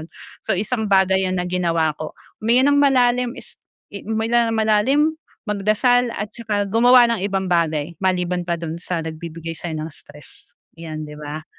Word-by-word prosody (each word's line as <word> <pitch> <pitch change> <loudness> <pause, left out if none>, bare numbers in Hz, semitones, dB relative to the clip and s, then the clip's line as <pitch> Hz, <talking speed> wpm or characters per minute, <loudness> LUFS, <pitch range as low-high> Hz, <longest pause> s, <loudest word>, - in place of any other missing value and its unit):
yun. 160 - -10 0.4
So 195 - +2
isang 215 +3 -2
bagay 190 -1 +3
yan 185 - -2
na 180 - -1
ginawa 170 -3 0
ko. 155 - -6 0.2
Huminga 250 +6 +3
ng 285 - +3
malalim, 250 -3 +3
is - - -10 0.4
huminga 225 +3 0
ng 225 - -1
malalim, 220 +9 +2 0.3
magdasal 215 +4 +2
at 210 0 -5
saka 210 -3 -2
gumawa 245 +2 +6
ng 225 - -2
ibang 190 -2 -1
bagay 160 -2 0
maliban 180 -2 -1
pa 170 - 0
do'n 165 0 -6
sa 170 -2 -3
nagbibigay 165 +1 -7
sa'yo 165 0 -5
ng 155 +1 -5
stress, 150 0 -15 0.2
yan 155 -2 -7
di 150 - -10
ba? 150 +1 -6
190 Hz, 170 wpm, -21 LUFS, 165-225 Hz, 0.4 s, gumawa